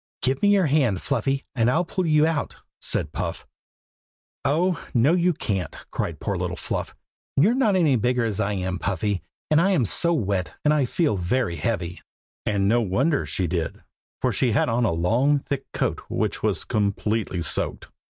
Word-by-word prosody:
"Give 130 +1 +1
me 205 - +4
your 200 -3 +4
hand, 135 -10 +2
Fluffy, 135 +6 -1
and 120 -3 +2
I'll 165 +8 +2
pull 185 +1 -2
you 155 -1 +4
out!" 160 -2 -1 0.2
said - - -2
Puff. - - -4 1.0
"Oh! 165 +5 +1
no, 125 +7 +4
you 180 0 +3
can't!" 100 - -3 0.2
cried - - -3
poor - - -2
little - - -2
Fluff. - - -4 0.4
"You're 185 +12 +5
not 240 -6 +2
any 155 -8 +3
bigger 125 +1 +1
as 105 -4 -2
I 105 +1 0
am, 95 -2 -2
Puffy, 100 0 -1 0.3
and 155 +1 +5
I'm 180 -9 +3
so 170 - +3
wet 100 - -1
I 150 -2 +3
feel 145 - 0
very 90 0 0
heavy." 90 -1 -2 0.5
And 100 -2 +1
no 120 +3 +3
wonder 135 - +1
she 95 - -1
did, 85 -1 -3 0.4
for - - +3
she 125 -4 +1
had 115 - +2
on 115 +1 +1
a 105 - +2
long 115 - +2
thick 140 0 -4
coat - - -1
which - - -1
was - - 0
completely 105 -2 -1
soaked. - - 0
125 Hz, 175 wpm, -24 LUFS, 100-155 Hz, 1.0 s, You're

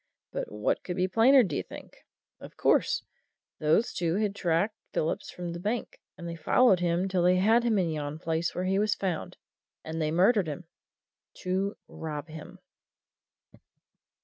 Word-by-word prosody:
But - - -4
what 105 0 -1
could 180 - -4
be 185 +1 +1
plainer, 245 +7 +6
d'ye 170 -9 -2
think? - - -12 0.4
of - - -12
course, - - +2 0.6
those 155 +10 +2
two 170 -1 0
had 210 -1 0
tracked 190 +2 0 0.2
Phillips 155 - -1
from 175 -1 -6
the 170 - -6
bank, 215 +6 -3 0.2
and 170 - -7
they 170 - -5
followed 185 +5 +4
him 175 +1 +1
till 185 -2 0
they 180 +1 +4
had 220 +6 +4
him 230 -3 +2
in 175 -4 +1
yon 150 -1 -4
place 165 +1 -2
where 180 - -2
he 190 +1 +1
was 210 0 +2
found, 185 -5 -3 0.5
and 160 +1 -4
they 155 - +1
murdered 185 +4 +3
him 155 +4 -5 0.8
to 190 +2 -1
rob 155 0 -6
him!" 155 -1 -10
180 Hz, 165 wpm, -28 LUFS, 160-200 Hz, 0.8 s, plainer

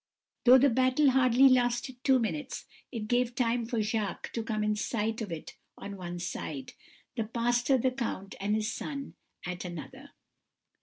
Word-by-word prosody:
Though 255 +1 +9
the 270 +1 +4
battle 260 +3 +4
hardly 255 0 +5
lasted 250 0 +1
two 265 -1 +5
minutes, 185 -11 -3 0.3
it 225 -4 -4
gave 245 +1 +1
time 235 -1 +1
for 230 -3 0
Jacques 215 -2 -2
to 230 - -1
come 220 -1 -2
in 210 0 +1
sight 220 +1 -2
of 205 -5 -4
it 165 -2 -7 0.2
on 200 0 -7
one 175 -2 -6
side; 155 -6 -5 0.4
the 225 -3 -1
pastor, 240 +3 +2
the 255 +1 +1
count, 230 -6 -4
and 205 +2 0
his 215 0 -1
son 280 +3 -5 0.3
at 180 0 -4
another. 190 - -8
230 Hz, 165 wpm, -30 LUFS, 210-255 Hz, 0.4 s, Though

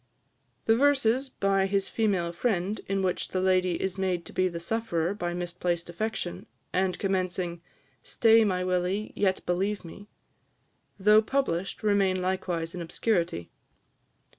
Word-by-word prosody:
The 225 - +5
verses 265 -1 +3
by 195 -4 +1
his 195 0 0
female 195 -6 0
friend, 195 +1 -1
in 195 0 0
which 180 -1 0
the 185 - -2
lady 185 -2 +2
is 190 0 -3
made 180 -3 -1
to - - -11
be 185 0 +2
the 170 -2 -4
sufferer 175 -2 -1
by 175 -4 -3
misplaced 175 -1 -2
affection, 185 -1 -4 0.3
and 185 0 +1
commencing, 185 -3 -1 0.4
"Stay, 225 -1 +4
my 185 -3 0
Willie, 185 +3 -1
yet 190 -2 0
believe 190 +3 -1
me," 200 +5 -11 0.9
though 210 +2 +6
published, 215 -7 -1
remain 200 -3 +2
likewise 180 -3 -2
in 180 - -5
obscurity. 170 - -1
190 Hz, 140 wpm, -28 LUFS, 175-210 Hz, 0.9 s, though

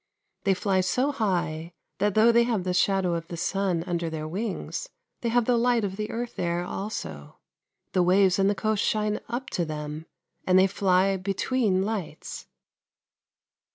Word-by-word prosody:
They 195 -1 +4
fly 190 0 +1
so 250 +10 +1
high 175 - -1 0.3
that 205 0 +1
though 220 +2 +6
they 235 0 +5
have 235 -5 0
the 180 0 -1
shadow 190 -1 +2
of 165 -1 -3
the 170 - -6
sun 180 -1 0
under 170 -2 -2
their 155 -1 -4
wings, 210 - -4 0.3
they 235 - -1
have 240 0 +2
the 245 0 +3
light 240 -1 +2
of 195 -1 -2
the 210 +1 -4
earth 240 +1 -4
there 175 0 0
also. 180 - -6 0.6
The 185 - +3
waves 185 +1 +4
and 195 0 +4
the 205 - +1
coast 215 0 0
shine 210 -1 0
up 260 +4 -4
to 175 - 0
them, 155 0 -5 0.4
and 185 0 +5
they 190 - +7
fly 190 0 +2
between 195 +1 0
lights. 210 -4 -5
195 Hz, 170 wpm, -26 LUFS, 175-215 Hz, 0.6 s, they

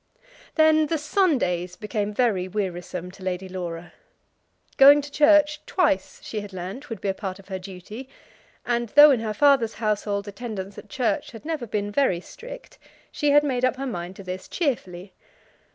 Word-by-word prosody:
Then 315 -1 +4
the 325 - 0
Sundays 255 - 0
became 210 -1 -3
very 205 -5 +1
wearisome 180 -2 -4
to 195 - -16
Lady 185 0 -3
Laura. 175 -2 -6 0.8
Going 285 +2 +9
to 290 0 -7
church 300 0 +4
twice, 295 - 0
she 215 - -4
had 205 -1 -10
learnt, 190 +11 -7
would 225 - -5
be - - -3
a - - +1
part 190 -1 -5
of 195 0 -17
her 190 -1 -4
duty; 195 +7 -9 0.6
and 240 -1 -1
though 295 +5 +8
in 255 - +2
her 215 -1 -3
father's 265 -3 +4
household 210 -2 -1
attendance 200 -2 -6
at 210 - -14
church 265 +4 -1
had 225 - -11
never 310 -7 -3
been 205 -1 -2
very 205 -7 +2
strict, - - -11 0.3
she 295 - 0
had 290 +1 +6
made 255 -4 -1
up 255 0 +3
her 270 +1 -5
mind 180 -6 -5
to 195 - -10
this 185 0 -6
cheerfully. 195 - -3
215 Hz, 175 wpm, -24 LUFS, 190-285 Hz, 0.8 s, Going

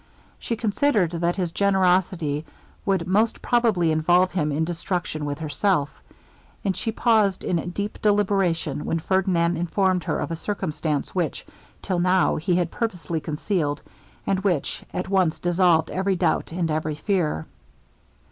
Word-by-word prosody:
She 230 - -2
considered 215 - +1
that 170 0 0
his 180 -4 -2
generosity 180 -6 +1 0.4
would 190 -4 +1
most 215 +5 +2
probably 220 -9 +2
involve 175 +4 +3
him 150 -5 0
in 155 +3 0
destruction 170 -2 -3
with 145 -1 -3
herself; 155 0 0 0.7
and 190 -2 +1
she 225 - -2
paused 220 -4 +2
in 175 -1 -1
deep 205 +4 -4
deliberation, 195 -7 +1
when 165 - 0
Ferdinand 175 -1 +1
informed 180 +2 +1
her - - 0
of - - -3
a - - -1
circumstance 155 -6 -3
which, 175 -4 -2 0.4
till 185 -3 -1
now, 180 +1 +3
he 175 +3 0
had 175 -2 0
purposely 180 -8 -3
concealed, 150 -1 -2 0.4
and 195 -1 +1
which 185 -7 -1
at 180 - -3
once 185 -5 +2
dissolved 175 -2 +2
every 190 +1 0
doubt 175 - 0
and 165 -1 -1
every 155 0 -1
fear. 155 - -1
180 Hz, 145 wpm, -24 LUFS, 160-195 Hz, 0.7 s, involve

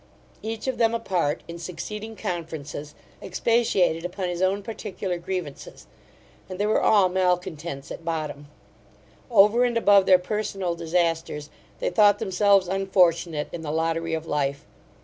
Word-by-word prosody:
Each 220 0 -5
of 260 -2 -2
them 230 0 +3
apart, 180 -9 -1
in 170 0 -8
succeeding 210 +6 -6
conferences, 160 -5 -5 0.3
expatiated 190 -4 +1
upon 180 +1 -3
his 175 0 -4
own 195 +2 +1
particular 195 -4 -4
grievances; 175 -5 -6 0.6
and 185 - -6
they 205 - 0
were 215 - +2
all 205 -3 +5
malcontents 180 -6 -2
at - - -7
bottom 155 -3 -4 0.8
Over 220 +2 +5
and 240 -1 +1
above 200 -3 +5
their 185 - +8
personal 195 -1 -2
disasters, 165 -3 -1 0.3
they - - -2
thought 205 +2 +5
themselves 195 0 +3
unfortunate 175 -5 +1
in 170 - -6
the 155 - -5
lottery 165 +1 -1
of 160 0 -5
life. 140 -1 -2
180 Hz, 140 wpm, -25 LUFS, 165-200 Hz, 0.8 s, their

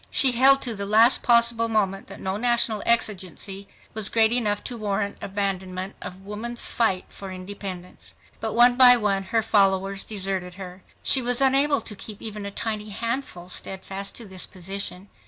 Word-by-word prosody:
She 265 - +4
held 270 +3 +5
to 240 - 0
the 200 -1 -4
last 225 +4 +5
possible 235 -1 +3
moment 195 -3 -1
that - - -10
no 190 0 -3
national 235 -1 +1
exigency 195 -3 -1 0.3
was 215 -1 +1
great 225 -1 +4
enough 215 -4 0
to 245 - -5
warrant 200 -2 -3
abandonment 190 -1 -3
of 190 +1 -9
woman's 230 +4 -3
fight 195 -6 0
for 195 -1 -9
independence. 185 -1 -8 0.2
But 220 -1 -3
one 245 +1 +5
by 250 -1 +9
one 205 -3 0
her 225 +4 0
followers 195 -1 +1
deserted 190 -3 -3
her. 185 -1 -10 0.2
She 265 - +4
was 245 0 +2
unable 275 +1 +3
to 210 - -7
keep 205 +1 -7
even 210 -2 -5
a - - -6
tiny 215 0 -3
handful 225 -4 -4
steadfast 195 +1 -4
to 235 - -8
this 190 -1 -6
position. 190 +1 -4
205 Hz, 170 wpm, -24 LUFS, 195-235 Hz, 0.3 s, by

